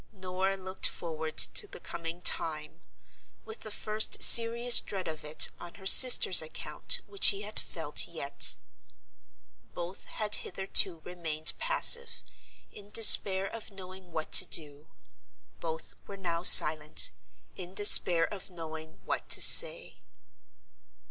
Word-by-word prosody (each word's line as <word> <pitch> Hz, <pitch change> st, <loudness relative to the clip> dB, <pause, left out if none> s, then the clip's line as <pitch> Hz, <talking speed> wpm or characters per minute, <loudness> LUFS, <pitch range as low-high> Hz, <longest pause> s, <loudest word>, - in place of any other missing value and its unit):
Norah 190 Hz, 0 st, -7 dB
looked 190 Hz, 0 st, -4 dB
forward 160 Hz, -2 st, -10 dB
to 420 Hz, -, -2 dB
the -, -, -15 dB
coming 165 Hz, +1 st, -10 dB
time, 155 Hz, -3 st, -1 dB, 0.6 s
with 445 Hz, -, -12 dB
the 215 Hz, -, -12 dB
first 215 Hz, +1 st, -2 dB
serious 235 Hz, +1 st, +4 dB
dread 190 Hz, -2 st, -10 dB
of 155 Hz, -1 st, -10 dB
it 150 Hz, +1 st, -1 dB
on 175 Hz, -, -14 dB
her 190 Hz, -, -18 dB
sister's 220 Hz, -4 st, +5 dB
account 155 Hz, -, -7 dB
which 395 Hz, -, -4 dB
she 200 Hz, 0 st, +3 dB
had 210 Hz, +1 st, -6 dB
felt -, -, -6 dB
yet. -, -, -2 dB, 1.2 s
Both 175 Hz, +2 st, -10 dB
had 210 Hz, -1 st, -5 dB
hitherto 190 Hz, -2 st, 0 dB
remained 160 Hz, -3 st, -3 dB
passive, 485 Hz, -1 st, +1 dB, 0.5 s
in 205 Hz, -1 st, -16 dB
despair 200 Hz, -3 st, +5 dB
of 225 Hz, +2 st, -11 dB
knowing 185 Hz, -2 st, -15 dB
what 160 Hz, -1 st, -9 dB
to -, -, +5 dB
do. 150 Hz, -1 st, -5 dB, 0.7 s
Both 160 Hz, -1 st, -9 dB
were 200 Hz, -, -12 dB
now 170 Hz, -3 st, -7 dB
silent, 155 Hz, -3 st, +5 dB, 0.4 s
in 185 Hz, 0 st, -12 dB
despair 175 Hz, -4 st, +3 dB
of 200 Hz, 0 st, -12 dB
knowing 160 Hz, -2 st, -13 dB
what -, -, -7 dB
to -, -, -1 dB
say. -, -, +1 dB
185 Hz, 130 wpm, -26 LUFS, 165-210 Hz, 1.2 s, sister's